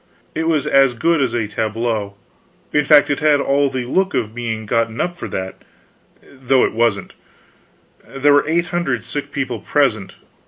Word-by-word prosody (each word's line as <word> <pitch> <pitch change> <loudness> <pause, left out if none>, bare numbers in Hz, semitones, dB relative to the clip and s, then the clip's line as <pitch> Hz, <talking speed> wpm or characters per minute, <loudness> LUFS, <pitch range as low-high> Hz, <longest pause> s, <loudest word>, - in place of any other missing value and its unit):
It 160 0 -2
was 155 -4 +1
as 135 -3 +3
good 165 +5 +1
as 130 - 0
a 115 -3 -1
tableau; 110 -1 -3 0.6
in 150 -1 +2
fact, 145 0 +5
it 145 - -1
had 150 -2 +3
all 140 0 +1
the 130 -2 -4
look 190 +10 0
of 110 -1 -2
being 115 -2 -4
gotten 115 +1 -1
up 175 0 -1
for - - -7
that, 95 0 -6 0.6
though 130 -1 +1
it - - -3
wasn't. 110 -4 0 0.9
There 140 +2 +2
were 145 0 +3
eight 170 +2 +1
hundred 135 -10 -1
sick 145 +4 -6
people 130 -5 -3
present. 115 -7 0
130 Hz, 170 wpm, -18 LUFS, 115-145 Hz, 0.9 s, fact